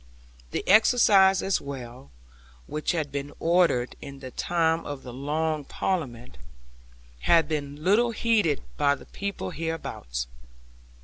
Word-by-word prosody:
The - - -4
excise 200 -3 +5
as 195 - +1
well 125 - -8 0.6
(which 150 - -2
had 155 -4 -2
been 140 +1 -4
ordered 165 -8 +2
in 140 -1 -8
the 130 - -8
time 165 +1 +1
of 145 -2 -6
the 125 - -8
Long 150 +3 -1
Parliament) 125 - -3 0.8
had 165 - +4
been 145 -1 -4
little 215 +7 +4
heeded 220 -9 +1
by 140 0 +3
the - - -14
people 200 - -5
hereabouts. 155 - -4
155 Hz, 125 wpm, -26 LUFS, 140-180 Hz, 0.8 s, excise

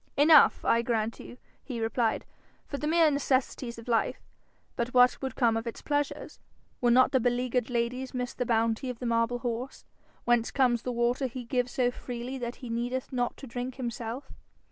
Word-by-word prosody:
'Enough, 300 +1 +6
I 230 - +4
grant 230 -2 -1
you,' 245 - -10 0.3
he 250 -4 -5
replied, 225 0 0 0.4
'for 280 - -5
the 300 - -2
mere 325 -1 +4
necessities 260 -3 -1
of 230 - -11
life. 230 -2 +1 0.6
But 240 +1 -3
what 250 0 +5
would 265 -4 -4
come 235 -3 +3
of 225 +1 -3
its 230 - -6
pleasures? 290 -1 -2 0.4
Would 240 -1 +4
not 255 +1 +5
the 260 - +3
beleaguered 245 0 0
ladies 245 +2 -2
miss 250 -1 -3
the - - -2
bounty 230 +2 +1
of 250 - -5
the 245 - -6
marble 230 +1 +1
horse? 245 +1 -5 0.4
Whence 240 -1 +3
comes 245 -4 +2
the 250 - -3
water 240 +3 +1
he 255 0 -7
gives 250 0 -1
so 245 -1 +2
freely 245 +2 -6
that 240 0 -4
he - - -6
needeth 245 +3 -3
not 245 -1 -1
to - - -9
drink 245 +1 -5
himself? 240 0 -5
245 Hz, 190 wpm, -29 LUFS, 235-260 Hz, 0.6 s, Enough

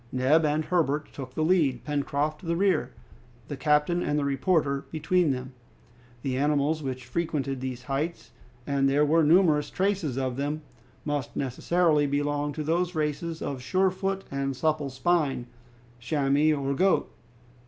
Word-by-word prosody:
Neb 140 +5 +3
and 150 +1 0
Herbert 155 -4 0
took 130 -2 -8
the 155 - 0
lead, 155 -8 +2
Pencroft 145 +2 -2
the 170 -1 -1
rear, 195 +2 +1 0.6
the 145 - -3
captain 150 +5 +2
and 150 - 0
the 145 - 0
reporter 140 0 +1
between 165 +2 +1
them. 130 -1 -3 0.7
The 130 -2 -1
animals 150 +2 +1
which 130 -3 -5
frequented 140 -1 -2
these 130 -2 -5
heights 140 +2 -3 0.3
and 140 -1 +2
there 145 +2 +3
were 160 +2 +3
numerous 155 -2 +4
traces 185 -9 -1
of 130 -2 -2
them 145 +2 -2 0.4
must 145 -3 -3
necessarily 150 +3 +1
belong 145 +1 -1
to 155 - -4
those 175 +3 0
races 160 +2 -2
of 135 -3 -4
sure 185 +8 +2
foot 195 +1 -2
and 135 -1 -2
supple 150 +1 0
spine, 140 -2 0 0.5
chamois 145 +3 +2
or 140 -1 -1
goat. 190 +6 +2
150 Hz, 150 wpm, -27 LUFS, 135-165 Hz, 0.7 s, numerous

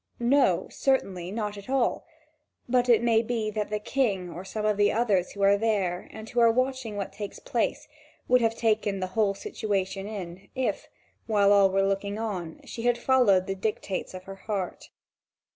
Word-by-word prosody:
No, 240 -7 +3
certainly, 190 -10 0
not 210 0 -3
at 200 - -13
all; 265 +2 0 0.6
but 250 0 +2
it 235 -1 +5
may 230 -1 +4
be 225 -2 -2
that 210 -1 -2
the 210 - -1
King 210 -6 -1
or 175 +2 -7
some 210 +2 -4
of 215 -1 +2
the 205 0 +3
others 210 -6 +1
who 200 - -3
are 200 +1 +5
there, 195 -5 0
and 220 0 -9
who 240 +1 -1
are 230 -1 +6
watching 255 -2 -1
what 200 - -4
takes 205 0 -6
place, - - -2 0.4
would 250 0 +4
have 225 -1 +1
taken 215 -3 +1
the 185 - -1
whole 205 -2 +2
situation 195 -1 -3
in, 190 -3 -7
if, 260 -1 -2 0.4
while 205 -2 +4
all 200 -1 +6
were 195 +1 +2
looking 200 +1 -1
on, 190 -7 -4
she 230 - -7
had 240 0 +2
followed 240 -7 +4
the 195 - -2
dictates 195 -1 -3
of 185 - -8
her 195 +1 -9
heart. 195 -3 -4
210 Hz, 185 wpm, -27 LUFS, 195-230 Hz, 0.6 s, are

